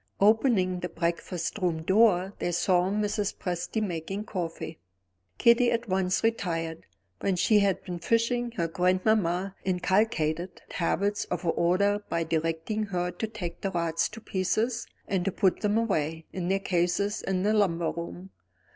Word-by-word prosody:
Opening 205 -4 +3
the 180 0 -4
breakfast 170 +2 -2
room 170 -4 0
door 190 0 +4
they 175 - -1
saw 180 +1 +2
Mrs. 210 0 -1
Presty 180 +5 -2
making 195 +2 -3
coffee. 165 -5 -5 0.6
Kitty 235 +1 +5
at 235 0 -1
once 185 0 +1
retired. 165 -7 -1 0.3
When 195 -2 0
she 210 +4 +4
had 200 -2 +1
been 180 -2 -5
fishing, 235 +5 +1
her 170 -7 -1
grandmamma 185 +1 +1
inculcated 180 -2 0
habits 200 +4 0
of 180 0 -4
order 195 +5 +2
by 165 0 0
directing 165 +6 -1
her 180 -3 -2
to 200 +5 -4
take 185 -6 -6
the 195 - -1
rods 170 -3 0
to 225 +1 -10
pieces, 225 +5 -1 0.2
and 190 -2 0
to 195 - 0
put 190 -1 +1
them 210 0 +2
away 160 -8 -1
in 180 -2 -3
their 195 +1 +2
cases 185 +2 0
in 185 -1 -1
the 210 +2 +3
lumber 170 -6 +2
room. 175 +3 -7
185 Hz, 150 wpm, -28 LUFS, 170-210 Hz, 0.6 s, Kitty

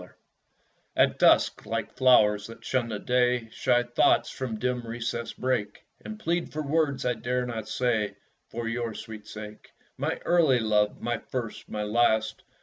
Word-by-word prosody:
At - - -12
Dusk - - -25 0.8
At - - +3
dusk, - - +4
like - - -3
flowers 105 -5 +4
that 115 0 -12
shun 125 -3 0
the 110 - -3
day, 125 0 +1
Shy 120 +1 +2
thoughts 120 0 +2
from 125 -4 -4
dim 125 +2 -1
recesses 115 0 -4
break, 120 -6 -2 0.2
And 215 0 -7
plead 170 -3 -1
for 155 +1 -3
words 145 -2 0
I 125 - +2
dare 125 +2 -2
not 110 -3 -5
say 115 -3 0 0.3
For 115 0 -4
your 115 -1 -3
sweet 110 -2 -9
sake. 105 0 -9 0.3
My - - 0
early 165 -7 +4
love! 105 -2 +1
my 120 -1 -1
first, 120 -3 -6
my 105 -1 -3
last! 110 0 +1
120 Hz, 165 wpm, -27 LUFS, 110-125 Hz, 0.8 s, dusk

